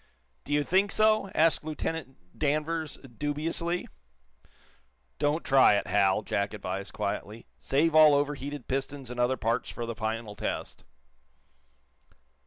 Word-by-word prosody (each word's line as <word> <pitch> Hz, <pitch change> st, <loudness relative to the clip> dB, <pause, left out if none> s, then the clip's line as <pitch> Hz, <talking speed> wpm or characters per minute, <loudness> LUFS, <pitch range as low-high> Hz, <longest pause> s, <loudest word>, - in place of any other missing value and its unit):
"Do -, -, -3 dB
you 145 Hz, 0 st, +3 dB
think 190 Hz, +6 st, +2 dB
so?" 215 Hz, -2 st, +3 dB
asked 160 Hz, 0 st, +3 dB
Lieutenant 155 Hz, -3 st, -4 dB, 0.2 s
Danvers, 155 Hz, +1 st, -1 dB
dubiously. 150 Hz, +6 st, -3 dB, 1.3 s
"Don't 150 Hz, +3 st, +1 dB
try 135 Hz, -6 st, +5 dB
it, 100 Hz, -, 0 dB
Hal," 100 Hz, 0 st, +2 dB
Jack 100 Hz, +1 st, -1 dB
advised, 95 Hz, 0 st, -4 dB
quietly. 105 Hz, +2 st, -4 dB
"Save 155 Hz, +4 st, +1 dB
all 155 Hz, -2 st, +7 dB
overheated 145 Hz, -1 st, -2 dB
pistons 135 Hz, -1 st, -3 dB
and 125 Hz, -, -6 dB
other 125 Hz, +2 st, +2 dB
parts 115 Hz, 0 st, -1 dB
for 120 Hz, -, -5 dB
the 115 Hz, -, -4 dB
final 110 Hz, 0 st, -4 dB
test." -, -, -5 dB
140 Hz, 125 wpm, -28 LUFS, 115-155 Hz, 1.3 s, all